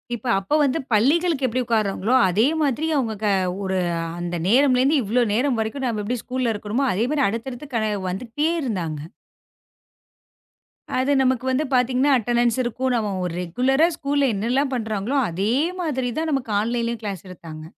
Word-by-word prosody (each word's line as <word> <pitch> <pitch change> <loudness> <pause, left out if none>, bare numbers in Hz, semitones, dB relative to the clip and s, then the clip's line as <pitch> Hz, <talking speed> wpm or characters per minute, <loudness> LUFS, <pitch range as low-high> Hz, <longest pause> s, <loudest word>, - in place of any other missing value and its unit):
இப்ப 245 +2 -8
அப்ப 195 +9 -4
வந்து 285 +2 +2
பள்ளிகளுக்கு 290 +6 +2
எப்படி 255 +2 -1
உக்காருறாங்களோ 215 0 0 0.2
அதே 210 +8 +3
மாதிரி 295 +2 0
அவங்க 240 -6 0
க - - +2 0.4
ஒரு 190 0 -1 0.4
அந்த 175 0 -3
நேரம்ல 255 +3 +4
இருந்து 285 +2 +3
இவ்ளோ 235 +4 +2
நேரம் 250 +2 +1
வரைக்கும் 220 +5 -2
நாம 225 -4 -1
எப்படி 240 +4 -2
ஸ்கூல்ல 250 -2 -1
இருக்கணுமோ, 215 +6 -2
அதே 215 +5 +1
மாதிரி 290 -3 +2
அடுத்தடுத்து 240 +6 -5
கனே 220 -1 +1 0.2
வந்துகிட்டே 240 - -2
இருந்தாங்க. 175 - -3 2.0
அது 265 +2 +1
நமக்கு 255 -1 +1
வந்து 275 +4 +1
பாத்தீங்கன்னா 255 +3 +3
அட்டண்டன்ஸ் 240 0 +1
இருக்கும். 250 +2 -1
நம்ம 215 -4 -1
ஒரு 175 - -3
ரெகுலரா 265 - +2
ஸ்கூல்ல 280 -1 +1
என்னல்லாம் 255 +7 0
பண்றாங்களோ, 220 +2 -2
அதே 195 +7 -1 0.3
மாதிரி 260 -6 -1
தான் 320 0 -1
நமக்கு 270 -5 -2
ஆன்லைன்லயும் 235 +1 -2
கிளாஸ் 200 -3 -5
எடுத்தாங்க. 160 -3 -10
240 Hz, 155 wpm, -22 LUFS, 215-270 Hz, 2.0 s, நேரம்ல